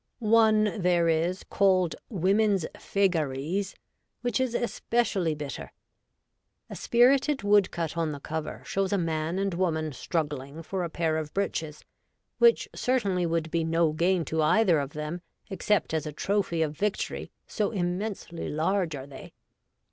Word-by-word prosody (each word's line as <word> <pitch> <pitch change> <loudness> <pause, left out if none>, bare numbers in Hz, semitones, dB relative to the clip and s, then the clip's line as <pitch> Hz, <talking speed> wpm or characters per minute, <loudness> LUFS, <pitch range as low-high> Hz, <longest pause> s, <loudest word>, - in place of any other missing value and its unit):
One 220 -2 +3
there 175 -1 +3
is, 165 +3 0
called 185 -3 +2
Women's 195 -1 +2
Fegat'ies, 175 0 -1 0.5
which 245 -2 0
is 255 -2 0
especially 215 -7 0
bitter. 145 -2 -6 1.0
A - - -5
spirited 265 +3 +3
woodcut 195 -6 +2
on 165 -2 0
the 145 - -6
cover 155 +2 -5
shows 195 -1 -1
a 200 - +2
man 165 0 -1
and 195 -1 0
woman 160 -4 -1
struggling 145 0 -3
for 185 +2 -3
a 170 - -3
pair 160 -1 0
of 155 -1 -4
breeches, 160 -6 -3 0.5
which 470 -1 +5
certainly 200 -9 0
would 165 -1 -1
be 165 -1 +1
no 165 0 +2
gain 170 +2 +1
to 160 0 -1
either 175 +1 +4
of 140 0 -4
them, 150 +3 -4 0.3
except 195 0 0
as 160 -1 -1
a - - -4
trophy 185 0 0
of 155 -1 -3
victory, 205 +4 -2 0.2
so 210 -3 -1
immensely 180 -2 -3
large 165 +1 0
are 135 -1 -7
they. 140 -1 -11
175 Hz, 145 wpm, -27 LUFS, 160-200 Hz, 1.0 s, which